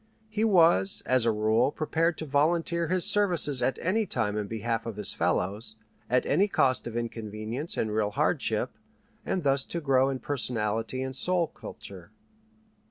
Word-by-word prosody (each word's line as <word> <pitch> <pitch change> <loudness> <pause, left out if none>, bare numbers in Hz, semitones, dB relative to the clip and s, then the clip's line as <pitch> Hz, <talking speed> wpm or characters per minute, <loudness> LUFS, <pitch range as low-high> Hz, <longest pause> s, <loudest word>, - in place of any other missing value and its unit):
He 215 0 -2
was 165 - +4
as 130 -2 +3
a 115 - +3
rule 110 +5 +2
prepared 160 +2 0
to 160 - -5
volunteer 165 +4 +1
his 185 0 +1
services 180 -9 +2
at 130 - 0
any 210 +4 0
time 105 -1 -1
in 105 -1 -2
behalf 115 +1 -3
of 115 - -5
his 105 -1 -1
fellows, 105 +4 -1 0.3
at 125 +1 +2
any 190 +8 +2
cost 130 -11 +1
of 120 0 -5
inconvenience 115 +4 -5
and 110 -1 -1
real 105 -1 +1
hardship, 105 - 0 0.6
and 185 - -1
thus 135 -1 +2
to 170 - -4
grow 135 -3 +2
in 135 - -2
personality 120 -2 -2
and 130 0 -5
soul 180 +4 +2
culture. 95 - -11
130 Hz, 165 wpm, -27 LUFS, 110-165 Hz, 0.6 s, was